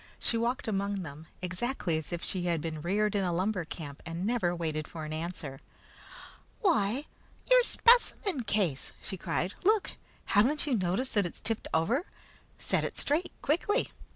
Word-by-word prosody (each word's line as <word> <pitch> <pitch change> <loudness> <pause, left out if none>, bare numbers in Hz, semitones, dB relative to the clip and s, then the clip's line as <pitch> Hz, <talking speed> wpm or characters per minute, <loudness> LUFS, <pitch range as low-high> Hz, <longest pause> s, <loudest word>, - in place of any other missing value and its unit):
She - - +1
walked 235 +2 0
among 200 -2 -1
them, 155 0 -9 0.2
exactly 180 0 -1
as 155 +1 -3
if 170 -1 -3
she 180 -2 -2
had 170 -2 +1
been 155 -1 -4
reared 205 +5 +1
in 200 -2 +1
a 180 - +1
lumber 185 +1 0
camp, 150 -3 -7
and 170 +2 -4
never 210 -7 +1
waited 155 -2 -2
for 160 -2 -6
an 155 - -5
answer. 155 -4 -5 1.0
"Why, 275 - +2 0.4
your - - +7
specimen 465 - +4
case!" 190 - 0
she - - -4
cried. 185 +1 -1
"Look! 425 +1 +3 0.3
Haven't 250 +9 +3
you 280 -5 +1
noticed 190 +6 0
that 205 -4 +3
it's - - -7
tipped 225 -1 -3
over? 230 - +2 0.5
Set - - +1
it - - -3
straight, 310 +6 +1
quickly!" 385 - +1
195 Hz, 165 wpm, -30 LUFS, 170-245 Hz, 1.0 s, your